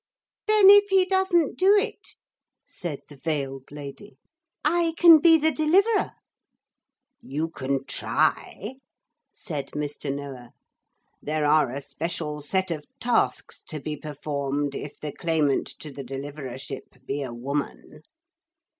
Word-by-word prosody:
'Then 420 Hz, -2 st, +8 dB
if 410 Hz, 0 st, +7 dB
he 380 Hz, -1 st, +5 dB
doesn't 375 Hz, -4 st, +2 dB
do 390 Hz, +3 st, +6 dB
it,' 405 Hz, -, -3 dB, 0.5 s
said 165 Hz, -6 st, -6 dB
the 145 Hz, -, -13 dB
veiled 135 Hz, -2 st, -4 dB
lady, 145 Hz, +7 st, -10 dB, 0.5 s
'I 330 Hz, +1 st, +2 dB
can 335 Hz, -2 st, +9 dB
be 325 Hz, +1 st, +7 dB
the 315 Hz, +1 st, +2 dB
Deliverer.' 385 Hz, +9 st, +2 dB, 1.1 s
'You 155 Hz, +4 st, -3 dB
can 135 Hz, -1 st, -2 dB
try,' 220 Hz, -, -1 dB, 0.5 s
said 145 Hz, -5 st, -5 dB
Mr. 150 Hz, -1 st, -3 dB
Noah. 135 Hz, -4 st, -7 dB, 0.7 s
'There 150 Hz, 0 st, -1 dB
are 150 Hz, -2 st, +4 dB
a 135 Hz, +3 st, -5 dB
special 150 Hz, +1 st, -4 dB
set 190 Hz, +5 st, 0 dB
of 150 Hz, -3 st, -5 dB
tasks 240 Hz, 0 st, 0 dB
to 155 Hz, -, -5 dB
be 150 Hz, +2 st, -4 dB
performed 145 Hz, -1 st, -3 dB
if 145 Hz, +1 st, -7 dB
the 150 Hz, -, -5 dB
claimant 155 Hz, -4 st, 0 dB
to 150 Hz, -, -9 dB
the 140 Hz, 0 st, -7 dB
Deliverership 135 Hz, -1 st, -8 dB
be 140 Hz, +2 st, -3 dB
a 130 Hz, -3 st, -4 dB
woman.' 125 Hz, -, -5 dB
150 Hz, 130 wpm, -25 LUFS, -, 1.1 s, can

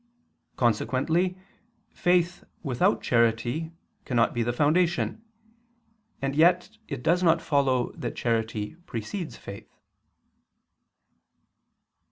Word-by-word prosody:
Consequently 135 Hz, -, +1 dB, 0.5 s
faith 175 Hz, 0 st, +1 dB, 0.2 s
without 155 Hz, -, +1 dB
charity 120 Hz, +7 st, +1 dB, 0.3 s
cannot 120 Hz, -2 st, +1 dB
be 120 Hz, -, -1 dB
the 120 Hz, +1 st, +1 dB
foundation: 170 Hz, -, +1 dB, 1.0 s
and 135 Hz, 0 st, -1 dB
yet 180 Hz, +6 st, +3 dB
it 140 Hz, -5 st, -5 dB
does 175 Hz, +2 st, +3 dB
not 165 Hz, -2 st, +4 dB
follow 135 Hz, -5 st, +1 dB
that -, -, -5 dB
charity 110 Hz, -3 st, -1 dB
precedes 150 Hz, -, -5 dB
faith. 100 Hz, 0 st, -10 dB
140 Hz, 90 wpm, -27 LUFS, 120-175 Hz, 1.0 s, not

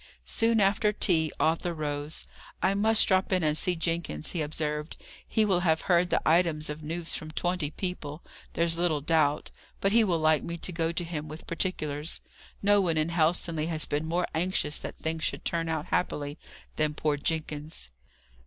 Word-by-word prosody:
Soon 225 Hz, 0 st, +2 dB
after 205 Hz, +1 st, +3 dB
tea, 165 Hz, -7 st, +2 dB
Arthur 165 Hz, +2 st, +1 dB
rose. 150 Hz, 0 st, -3 dB, 0.3 s
"I 195 Hz, -, +2 dB
must 215 Hz, +2 st, +4 dB
drop 190 Hz, 0 st, +2 dB
in 185 Hz, -2 st, +2 dB
and 150 Hz, -1 st, +2 dB
see 180 Hz, +3 st, +2 dB
Jenkins," 165 Hz, -, -2 dB
he 170 Hz, -, -2 dB
observed. 150 Hz, 0 st, -2 dB, 0.3 s
"He 220 Hz, -, +2 dB
will 190 Hz, -4 st, +3 dB
have 160 Hz, -3 st, +2 dB
heard 175 Hz, -1 st, +3 dB
the -, -, 0 dB
items 160 Hz, -2 st, +2 dB
of 150 Hz, +1 st, -7 dB
news 165 Hz, +2 st, -1 dB
from 155 Hz, -, -2 dB
twenty 175 Hz, -1 st, -1 dB
people, 155 Hz, -3 st, -5 dB, 0.3 s
there's 170 Hz, 0 st, 0 dB
little 165 Hz, -4 st, +1 dB
doubt; 150 Hz, -1 st, +1 dB, 0.3 s
but 195 Hz, -, +2 dB
he 230 Hz, +1 st, +5 dB
will 180 Hz, -5 st, +2 dB
like 155 Hz, -1 st, +3 dB
me 170 Hz, 0 st, -5 dB
to 180 Hz, -, -3 dB
go 165 Hz, -1 st, 0 dB
to 170 Hz, +1 st, 0 dB
him 155 Hz, -3 st, -5 dB
with 155 Hz, +2 st, -9 dB
particulars. 155 Hz, -3 st, -2 dB, 0.4 s
No 205 Hz, 0 st, +5 dB
one 170 Hz, -4 st, +1 dB
in 155 Hz, +1 st, +1 dB
Helstonleigh 165 Hz, -1 st, +1 dB
has 160 Hz, -2 st, +1 dB
been 150 Hz, +2 st, -2 dB
more 175 Hz, +2 st, +1 dB
anxious 160 Hz, -3 st, 0 dB
that -, -, -7 dB
things 160 Hz, 0 st, -3 dB
should -, -, -2 dB
turn 165 Hz, -1 st, -1 dB
out 160 Hz, -1 st, -2 dB
happily, 145 Hz, -3 st, -1 dB, 0.4 s
than 155 Hz, -1 st, +1 dB
poor 150 Hz, 0 st, +1 dB
Jenkins." 150 Hz, -, -4 dB
165 Hz, 180 wpm, -28 LUFS, 155-180 Hz, 0.4 s, he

